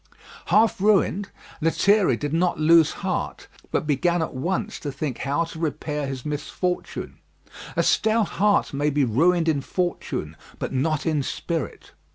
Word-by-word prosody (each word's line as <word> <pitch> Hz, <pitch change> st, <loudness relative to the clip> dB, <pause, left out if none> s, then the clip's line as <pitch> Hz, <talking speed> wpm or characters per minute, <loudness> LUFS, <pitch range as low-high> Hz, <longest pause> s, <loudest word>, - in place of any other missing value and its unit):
Half 220 Hz, -1 st, +3 dB
ruined, 205 Hz, -1 st, +2 dB, 0.3 s
Lethierry 180 Hz, -, +3 dB
did 145 Hz, +3 st, -3 dB
not 175 Hz, +1 st, +1 dB
lose 160 Hz, 0 st, +5 dB
heart, -, -, -3 dB, 0.2 s
but -, -, -1 dB
began 170 Hz, +4 st, +1 dB
at -, -, -5 dB
once 190 Hz, +10 st, -2 dB
to 145 Hz, -, -4 dB
think 135 Hz, -2 st, -4 dB
how 145 Hz, +5 st, 0 dB
to 165 Hz, -1 st, -8 dB
repair 150 Hz, -2 st, -2 dB
his 135 Hz, -2 st, -6 dB
misfortune. 155 Hz, +4 st, -3 dB, 0.6 s
A -, -, +2 dB
stout 220 Hz, -1 st, +2 dB
heart 205 Hz, -6 st, +3 dB
may 145 Hz, +2 st, +1 dB
be 145 Hz, 0 st, +1 dB
ruined 165 Hz, +9 st, +2 dB
in 150 Hz, -4 st, +2 dB
fortune, 170 Hz, -, -3 dB, 0.2 s
but -, -, -4 dB
not 150 Hz, +3 st, 0 dB
in 155 Hz, -3 st, +1 dB
spirit. 160 Hz, +2 st, -4 dB
160 Hz, 150 wpm, -24 LUFS, 145-180 Hz, 0.6 s, lose